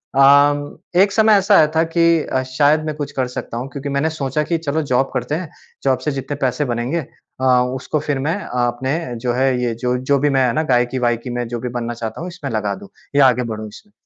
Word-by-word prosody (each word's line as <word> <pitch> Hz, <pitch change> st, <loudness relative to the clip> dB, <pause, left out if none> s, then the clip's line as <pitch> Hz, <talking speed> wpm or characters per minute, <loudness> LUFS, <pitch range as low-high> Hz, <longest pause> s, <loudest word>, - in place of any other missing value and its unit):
अ, 145 Hz, +1 st, +4 dB, 0.2 s
एक 200 Hz, 0 st, +4 dB
समय 220 Hz, 0 st, +4 dB
ऐसा 200 Hz, +1 st, +3 dB
आया 155 Hz, -, +6 dB
था 160 Hz, -, +4 dB
कि 165 Hz, -1 st, +3 dB
अ, 130 Hz, -, -1 dB
शायद 145 Hz, +4 st, +2 dB
मैं 155 Hz, -1 st, -3 dB
कुछ 145 Hz, -1 st, -5 dB
कर 130 Hz, -2 st, -1 dB
सकता 115 Hz, -, -5 dB
हूँ 125 Hz, -, -4 dB
क्योंकि 140 Hz, 0 st, -5 dB
मैंने 140 Hz, +3 st, 0 dB
सोचा 150 Hz, -1 st, -2 dB
कि 165 Hz, +2 st, -1 dB
चलो 160 Hz, 0 st, -1 dB
जॉब 130 Hz, +2 st, +2 dB
करते 125 Hz, +3 st, -2 dB
हैं। 170 Hz, -2 st, -5 dB, 0.3 s
जॉब 130 Hz, -2 st, +2 dB
से 150 Hz, -, +1 dB
जितने 135 Hz, +1 st, -4 dB
पैसे 135 Hz, +3 st, 0 dB
बनेंगे 125 Hz, +5 st, -2 dB, 0.4 s
अ, 130 Hz, -, +1 dB, 0.3 s
उसको 140 Hz, +3 st, -2 dB
फिर 145 Hz, -2 st, -2 dB
मैं 155 Hz, +6 st, 0 dB
अपने 125 Hz, +4 st, -1 dB, 0.2 s
जो 120 Hz, 0 st, -1 dB
है, 130 Hz, -1 st, +1 dB
ये 120 Hz, -2 st, 0 dB
जो 125 Hz, +2 st, -1 dB
जो 135 Hz, +3 st, +1 dB
भी 145 Hz, -, +2 dB
मैं 135 Hz, -2 st, +3 dB
है 115 Hz, -, 0 dB
ना? 155 Hz, -, +1 dB
गायकी-वायकी 120 Hz, -3 st, 0 dB
में 120 Hz, -1 st, -3 dB
जो 120 Hz, 0 st, -4 dB
भी 125 Hz, +1 st, -4 dB
बनना 120 Hz, 0 st, -3 dB
चाहता 115 Hz, +4 st, -6 dB
हूँ, 175 Hz, -, -4 dB
इसमें 170 Hz, -6 st, -7 dB
लगा 105 Hz, -2 st, -1 dB
दूँ 200 Hz, +1 st, -12 dB, 0.3 s
या 140 Hz, -1 st, +6 dB
आगे 125 Hz, 0 st, +2 dB
बढ़ूँ 110 Hz, 0 st, -6 dB
इसमें। 210 Hz, -, -15 dB
135 Hz, 235 wpm, -19 LUFS, 125-155 Hz, 0.4 s, आया